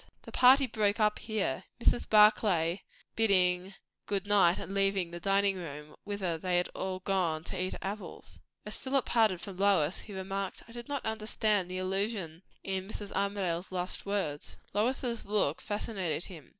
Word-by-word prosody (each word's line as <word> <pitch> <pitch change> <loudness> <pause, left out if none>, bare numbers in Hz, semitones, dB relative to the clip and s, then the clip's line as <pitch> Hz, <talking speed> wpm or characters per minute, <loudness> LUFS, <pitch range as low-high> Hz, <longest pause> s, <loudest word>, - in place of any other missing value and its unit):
The - - -10
party 265 +2 +6
broke 215 -3 0
up 210 -1 +2
here, 215 - -2
Mrs. 240 - +2
Barclay 205 -5 +4 0.3
bidding 185 -3 +2 0.3
good 200 -1 -1
night 195 -4 +4
and 195 - -6
leaving 195 -3 +1
the 175 - -6
dining 195 +1 +2
room, 150 -3 -8
whither 190 -5 -2
they 180 +1 0
had 175 - 0
all 185 0 -4
gone 180 -5 0
to 180 +1 -4
eat 185 - -2
apples. 200 +2 -7 0.3
As - - +1
Philip 270 -1 0
parted 215 -7 +2
from 195 -3 -8
Lois 190 -5 +3
he 205 - -10
remarked, 195 0 -4
"I - - -14
did 240 0 -8
not 285 -1 -3
understand 215 -3 0
the 185 - -4
allusion 185 -3 -2 0.2
in 190 -1 -3
Mrs. 205 -1 -6
Armadale's 195 -3 -1
last 180 0 -2
words." 175 -8 -2 0.2
Lois's 235 +2 0
look 200 -8 +1
fascinated 195 -6 -3
him. 160 -8 -11
195 Hz, 165 wpm, -31 LUFS, 180-210 Hz, 0.3 s, party